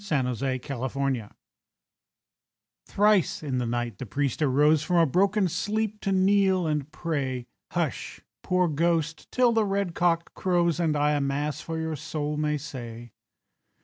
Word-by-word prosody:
THE 130 - -1
PRIEST'S - - -12 0.3
BROTHER 135 -6 -1 1.6
Thrice 205 -6 +2
in 130 -4 -1
the 120 - -1
night 120 -3 -3
the 130 - -6
priest 140 +4 -1
arose 150 +2 +4
From 170 +1 +3
broken 195 +3 +3
sleep 210 +4 -2
to 195 - -1
kneel 190 -1 +3
and 150 -2 -2
pray. 135 -7 -3 0.3
"Hush, - - -2 0.2
poor 180 -1 +2
ghost, 165 +1 -1
till 250 -1 +4
the 225 -1 +2
red 200 -3 -1
cock 170 -1 +1
crows, 175 -2 +1
And 160 -3 +1
I 145 0 +2
a 145 -1 +1
Mass 140 +1 -2
for 165 -1 -5
your 160 -1 -2
soul 150 0 -3
may 150 0 0
say." 120 -5 -8
155 Hz, 150 wpm, -26 LUFS, 140-180 Hz, 1.6 s, arose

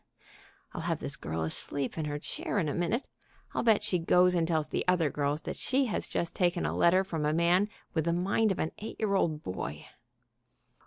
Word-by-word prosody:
(I'll - - -4
have - - -1
this - - 0
girl 80 +1 -3
asleep 135 - -1
in 160 - -2
her 145 -1 -2
chair 150 - -3
in 160 - +1
a 145 - -1
minute. 190 +9 -1 0.5
I'll - - 0
bet 225 -3 +5
that 205 - -5
she 195 -4 0
goes 180 +2 +4
and 170 -2 +1
tells 160 -3 0
the - - -1
other 175 -5 +3
girls 145 +1 -1
that - - -5
she 265 +1 +1
has - - -2
just 170 - -2
taken 175 -1 +1
a - - -1
letter 185 +2 +4
from 165 -5 -3
a 150 +1 +1
man 175 +5 +3 0.2
with 160 -3 0
the 170 - +2
mind 195 +5 +2
of 190 - -1
an 160 - -1
eight 215 - -7
year 215 -3 +1
old 160 -5 +1
boy).... 75 -5 -5
170 Hz, 220 wpm, -30 LUFS, 150-190 Hz, 0.5 s, bet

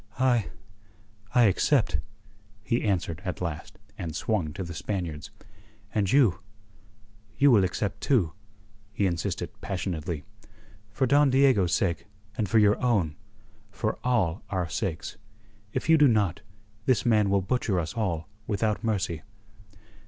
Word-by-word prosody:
"I... 120 -6 +2 0.9
I 125 - +6
accept," 100 -5 +3 0.6
he 115 +2 0
answered 90 -5 -1
at 90 -2 -4
last, 85 -4 -5 0.2
and 80 -3 -4
swung 90 -6 -1
to 95 - -4
the 85 -1 -7
Spaniards. 85 -4 -4 0.6
"And 100 -3 +1
you 125 -10 +4 1.0
you 140 +1 +6
will 105 -5 +6
accept 95 +2 -2
too," 100 - +2 0.6
he 105 - 0
insisted 85 -3 -2
passionately. 85 -5 -3 0.7
"For 120 +6 0
Don 140 +2 +4
Diego's 130 -9 +4
sake 90 +1 -1 0.3
and 110 -5 -1
for 110 - +3
your 105 -1 +4
own 100 -11 +1 0.5
for - - -3
all 105 -9 +1
our 95 -3 -1
sakes. 95 +1 -4 0.5
If - - -3
you 160 -1 +6
do 150 - +7
not, 105 -7 +1 0.5
this 130 -5 +2
man 105 -4 +3
will 100 0 +3
butcher 100 -2 0
us 80 -2 -3
all 90 -9 -2 0.2
without 105 +1 0
mercy." 100 -7 -1
100 Hz, 135 wpm, -27 LUFS, 85-115 Hz, 1.0 s, do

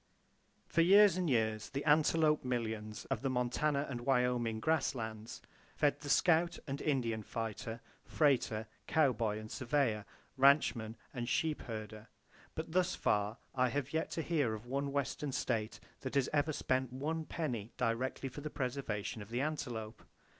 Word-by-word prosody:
For 165 - +2
years 195 +2 +7
and 180 -3 0
years, 110 -3 +1
the 140 0 -4
antelope 155 0 +4
millions 110 -4 -3
of 125 -5 0
the 135 - 0
Montana 135 +4 +1
and 120 -3 -4
Wyoming 125 -3 +1
grass 155 0 +1
lands 110 -1 -6 0.3
fed 145 -1 +2
the 145 - -7
scout 170 +2 +4
and 140 0 -4
Indian 120 -7 0
fighter, 115 +1 -5 0.2
freighter, 125 -7 +2 0.2
cowboy 120 -8 +2
and 110 0 -8
surveyor, 130 -6 0 0.3
ranchman 130 -5 +4 0.2
and 120 -2 -3
sheep 155 +4 0
herder; 110 -2 -7 0.5
but 160 0 -5
thus 185 +1 +2
far 105 +2 +1 0.2
I 130 -1 +2
have 140 +2 -3
yet 160 - 0
to 165 - 0
hear 145 -10 +1
of 110 +2 -10
one 140 +3 -2
Western 140 +1 -2
state 115 -4 -1 0.2
that 130 +1 -5
has 140 -2 +2
ever 150 +1 +2
spent 130 -3 0
one 155 +5 -2
penny 120 -12 -3
directly 125 +2 -1
for 135 +3 -8
the 150 - -4
preservation 125 -6 -3
of 100 - -10
the 120 +2 -1
antelope! 125 -8 -4
130 Hz, 155 wpm, -34 LUFS, 115-150 Hz, 0.5 s, years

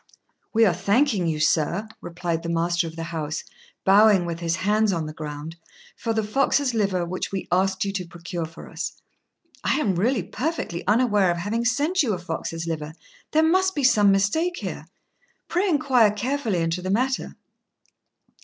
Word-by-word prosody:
"We 225 0 +4
are 185 - +3
thanking 200 - +2
you, 155 -2 -1
sir," 165 +6 +1
replied 170 -1 -3
the 170 - -5
master 170 +1 +1
of 160 - -8
the 165 - -5
house, 155 -1 -3 0.4
bowing 200 -1 +6
with 170 -1 -4
his 170 -1 0
hands 210 +3 +2
on 165 -4 -1
the 155 - -6
ground, 155 +1 -7 0.4
"for 230 - -3
the 220 -1 0
fox's 270 +3 +1
liver 195 -5 0
which 185 +2 -4
we 195 -1 -4
asked 190 +2 +1
you 195 - -2
to 185 -3 -4
procure 170 0 -5
for 165 - -12
us." - - -5 0.7
"I - - +1
really 205 - +1
am - - -20
perfectly 260 - -3
unaware 210 -4 +3
of 175 - 0
having 215 +7 -2
sent 290 +10 +2
you 240 -7 +1
a - - -2
fox's 165 -1 -4
liver: 155 -2 -4 0.4
there 315 +1 +3
must 375 +3 +3
be 290 - -1
some 210 -6 +5
mistake 315 - +1
here. - - -6 0.6
Pray 370 +3 +1
inquire 265 -8 +4
carefully 220 -3 -1
into 165 +2 -1
the 185 - -4
matter." 255 +6 0
195 Hz, 175 wpm, -24 LUFS, 170-235 Hz, 0.7 s, bowing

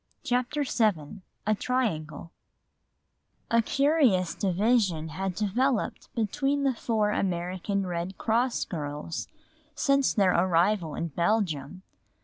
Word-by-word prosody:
CHAPTER 250 +4 0
VII 205 - 0 0.2
A 215 - +3
Triangle 165 - -2 1.2
A 230 0 +5
curious 270 - +2
division 190 -4 +1
had 185 +3 -3
developed 230 +5 0
between 275 +6 0
the 270 -1 +2
four 220 -3 0
American 185 +1 -1
Red 175 +1 -4
Cross 235 +3 +1
girls 150 0 -5 0.5
since 275 -1 +2
their 195 -3 +3
arrival 175 -1 +2
in 170 - -3
Belgium. 170 -1 -1
200 Hz, 105 wpm, -27 LUFS, 170-240 Hz, 1.2 s, A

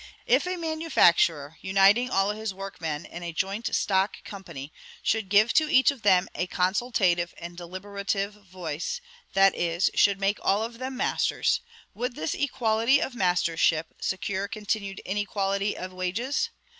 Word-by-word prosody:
If - - +3
a 365 - -1
manufacturer, 175 - +2
uniting 195 +6 +4
all 195 -2 +2
his 215 -2 -4
workmen 170 -6 -5
in 175 - -9
a 170 -1 -4
joint 195 +7 -2
stock 195 0 0
company, 170 -8 -9 0.3
should 220 -3 0
give 210 +3 +5
to 310 -1 +3
each 260 +2 +6
of 275 -5 -11
them 190 -3 +4
a 180 - -2
consultative 185 -2 +1
and 170 0 -8
deliberative 200 +3 -4
voice, 185 - -5 0.4
that 195 0 +6
is, 170 +1 0
should 200 -1 +3
make 200 +1 0
all 205 +3 +2
of 230 +1 -6
them 260 0 -5
masters, - - +1 0.3
would 245 +3 -3
this 160 - -2
equality 245 -1 +2
of 265 - -2
mastership 170 -5 +1
secure 190 +1 -2
continued 205 -2 -3
inequality 200 0 -1
of 185 0 -6
wages? 230 - -1
195 Hz, 145 wpm, -26 LUFS, 180-220 Hz, 0.4 s, each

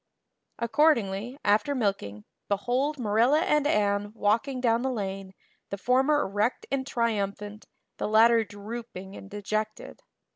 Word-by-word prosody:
Accordingly, 235 -3 +1
after 215 +8 +2
milking, 195 - -2 0.2
behold 250 +9 0
Marilla 240 +6 +3
and 300 -3 +2
Anne 205 -3 +1
walking 230 +6 0
down 235 -2 +2
the 265 - -1
lane, 195 -5 -5 0.3
the 200 - -4
former 265 +7 +2
erect 205 +5 -1
and 270 -1 -1
triumphant, 210 -3 -2 0.3
the - - -2
latter 225 +2 +5
drooping 205 -2 -8
and 195 - -11
dejected. 215 +1 -4
220 Hz, 120 wpm, -27 LUFS, 200-250 Hz, 0.3 s, latter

